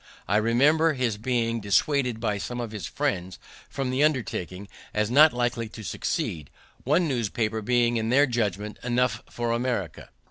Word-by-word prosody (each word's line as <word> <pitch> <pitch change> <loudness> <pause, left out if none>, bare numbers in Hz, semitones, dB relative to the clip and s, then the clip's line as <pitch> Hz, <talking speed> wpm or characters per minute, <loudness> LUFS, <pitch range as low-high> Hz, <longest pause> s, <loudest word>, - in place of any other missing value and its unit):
I 105 - +2
remember 145 +9 +3
his 125 -6 -1
being 115 0 -1
dissuaded 125 +4 +1
by 105 -3 -1
some 120 +4 -5
of 120 -3 -4
his 105 -6 -5
friends 90 -1 -2 0.3
from 135 -2 -3
the 130 +3 +2
undertaking, 100 - -1 0.3
as 105 +1 0
not 150 +4 +7
likely 120 -2 -2
to 110 0 -10
succeed, 75 -6 -3 0.3
one 155 +6 +2
newspaper 115 -4 -1
being, 120 +1 +2
in 110 0 -1
their 140 +4 +5
judgment, 105 -5 -2
enough 120 -3 0
for 120 -1 -2
America. 115 -9 -2
115 Hz, 155 wpm, -26 LUFS, 105-125 Hz, 0.3 s, not